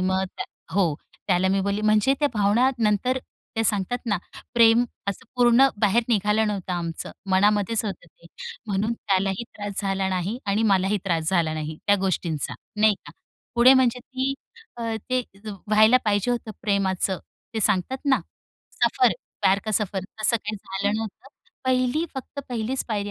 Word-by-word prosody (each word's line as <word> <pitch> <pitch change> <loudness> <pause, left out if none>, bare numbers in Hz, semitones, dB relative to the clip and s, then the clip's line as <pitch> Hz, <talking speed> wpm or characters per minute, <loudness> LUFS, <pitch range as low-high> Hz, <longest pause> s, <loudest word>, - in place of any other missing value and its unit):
मग 190 +1 +1
त्या - - -3 0.3
हो, 180 -6 +2 0.3
त्याला 185 -1 +2
मी 195 +1 +2
बोलली 200 +1 -1
म्हणजे 215 +4 +3
त्या 290 - +3
भावना 210 +5 +3
नंतर 225 +4 +1 0.4
ते 225 - +2
सांगतात 205 +3 +1
ना 205 -3 +2 0.4
प्रेम 230 0 +6 0.2
असं 200 - -4
पूर्ण 245 +2 +6
बाहेर 215 +3 +3
निघालं 210 0 +2
नव्हतं 195 -3 -3
आमचं, 170 -2 -4 0.2
मनामध्येच 205 +3 +3
होतं 200 -3 -5
ते, - - -21 0.4
म्हणून 210 +2 0
त्यालाही 195 -1 -1
त्रास 205 -2 -4
झाला 195 -1 0
नाही 185 +5 -2
आणि 200 +2 +1
मलाही 195 -1 +2
त्रास 165 -4 0
झाला 170 -4 +1
नाही 155 0 -4
त्या 205 - +5
गोष्टींचा, 170 -5 -1 0.3
नाही 215 -1 +5
का. - - -9 0.4
पुढे 240 +2 +7
म्हणजे 255 -2 +3
ती 260 +1 0 0.4
अ, 235 - -5 0.3
ते 255 0 +2 0.3
त - - -4 0.2
व्हायला 215 +3 +6
पाहिजे 205 +2 +1
होतं 235 -2 -2
प्रेमाचं 190 -2 0 0.4
ते 220 - -1
सांगतात 210 +5 +1
ना 275 -2 +3 0.6
सफर, - - +4 0.3
प्यार 190 +1 +4
का 215 - -2
सफर 195 -3 0 0.2
असं 235 +2 +4
काही 210 -1 -5
झालं 200 +1 -2
नव्हतं. 220 +4 -6 0.4
पहिली 255 +4 +1
फक्त 270 +2 -6
पहिलीच 245 +2 -2
पायरी 205 -2 -2
210 Hz, 160 wpm, -24 LUFS, 190-235 Hz, 0.6 s, पुढे